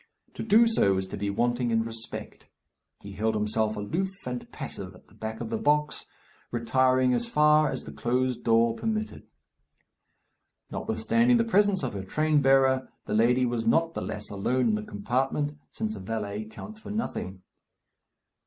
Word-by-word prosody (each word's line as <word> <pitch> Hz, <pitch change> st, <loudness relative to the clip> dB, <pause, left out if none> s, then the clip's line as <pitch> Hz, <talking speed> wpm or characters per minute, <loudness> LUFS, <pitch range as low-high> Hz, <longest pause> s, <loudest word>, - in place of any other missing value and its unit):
To -, -, -6 dB
do 225 Hz, +1 st, +5 dB
so 100 Hz, -, +3 dB
is 95 Hz, -, -1 dB
to -, -, -5 dB
be 100 Hz, 0 st, -2 dB
wanting 120 Hz, +4 st, 0 dB
in 115 Hz, -1 st, +2 dB
respect. 115 Hz, 0 st, -6 dB, 0.5 s
He 100 Hz, -, -9 dB
held 110 Hz, +2 st, -1 dB
himself 110 Hz, +1 st, 0 dB
aloof 165 Hz, -, -1 dB, 0.2 s
and 125 Hz, -1 st, -5 dB
passive -, -, -7 dB
at -, -, -19 dB
the -, -, -21 dB
back 110 Hz, 0 st, -6 dB
of 225 Hz, -, -5 dB
the 225 Hz, -, -1 dB
box, 150 Hz, -6 st, +1 dB, 0.4 s
retiring 130 Hz, +2 st, +2 dB
as 235 Hz, -, 0 dB
far 150 Hz, -6 st, +4 dB
as -, -, -4 dB
the -, -, -9 dB
closed 125 Hz, +1 st, -1 dB
door 115 Hz, 0 st, +4 dB
permitted. 220 Hz, -, -3 dB, 1.4 s
Notwithstanding 240 Hz, +1 st, +2 dB
the 230 Hz, -, +3 dB
presence 205 Hz, -5 st, +2 dB
of 125 Hz, -, -2 dB
her 100 Hz, -1 st, -4 dB
train 155 Hz, +8 st, +1 dB
bearer, 135 Hz, -1 st, +3 dB, 0.2 s
the -, -, -3 dB
lady 125 Hz, +4 st, +3 dB
was 120 Hz, -2 st, -2 dB
not 165 Hz, +7 st, +3 dB
the -, -, -4 dB
less 105 Hz, 0 st, -5 dB
alone 120 Hz, +5 st, +1 dB
in -, -, +2 dB
the 105 Hz, -, 0 dB
compartment, 130 Hz, +8 st, -1 dB, 0.2 s
since 220 Hz, 0 st, -4 dB
a -, -, -7 dB
valet 105 Hz, -1 st, -4 dB
counts 215 Hz, -, -10 dB
for -, -, -10 dB
nothing. 95 Hz, -, -4 dB
125 Hz, 170 wpm, -27 LUFS, 110-155 Hz, 1.4 s, do